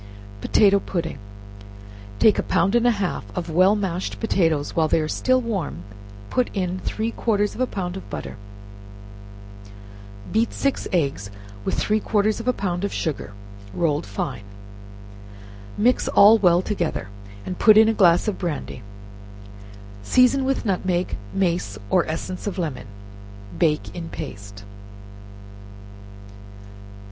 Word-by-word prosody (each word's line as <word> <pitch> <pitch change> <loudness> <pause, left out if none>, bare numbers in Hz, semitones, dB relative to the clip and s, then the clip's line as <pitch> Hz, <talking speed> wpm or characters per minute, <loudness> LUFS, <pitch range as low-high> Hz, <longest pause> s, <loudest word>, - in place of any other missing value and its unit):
Potato 200 - +4
Pudding. 170 -4 -4 1.0
Take 215 - +4
a - - +3
pound 195 - +1
and 240 0 +3
a 235 -3 +2
half 195 -3 -2
of 170 -2 -3
well 185 +5 +4
mashed 190 -3 -3
potatoes; 165 -9 0
while 160 -1 +3
they 160 - +2
are 155 - -1 0.3
warm 200 - -3 0.5
put 250 -1 +1
in 185 -1 -2
three 220 +4 -3
quarters 210 -3 0
of - - -6
a 255 - +2
pound 180 -4 -4
of 190 - -9
butter; - - -6 2.0
beat 225 +2 +1
six 275 -1 -1
eggs 140 - -1 0.3
with - - -1
three 215 +1 +1
quarters 215 +1 0
of 230 - -7
a - - +5
pound 185 -5 -3
of 200 - -1
sugar, 150 - -3 0.4
rolled 150 -8 0
fine, 100 +1 -4 1.4
mix 245 +5 +2
all 215 +3 +7
well 180 -2 +4
together, 175 - -2 0.4
and 185 - -5
put 215 -1 +7
in 220 0 +7
a 225 - +3
glass 175 -2 +4
of 210 - -2
brandy; 160 -7 -4 1.2
season 255 - +3
with 270 -2 -1
nutmeg, 185 -2 -1 0.2
mace 175 - -1
or - - +3
essence 180 +5 -5
of 200 - -3
lemon, 150 -10 -4 0.6
and 85 - -11
bake 150 -1 0
in 170 -2 -6
paste. 100 0 -8
185 Hz, 135 wpm, -23 LUFS, 165-215 Hz, 2.0 s, all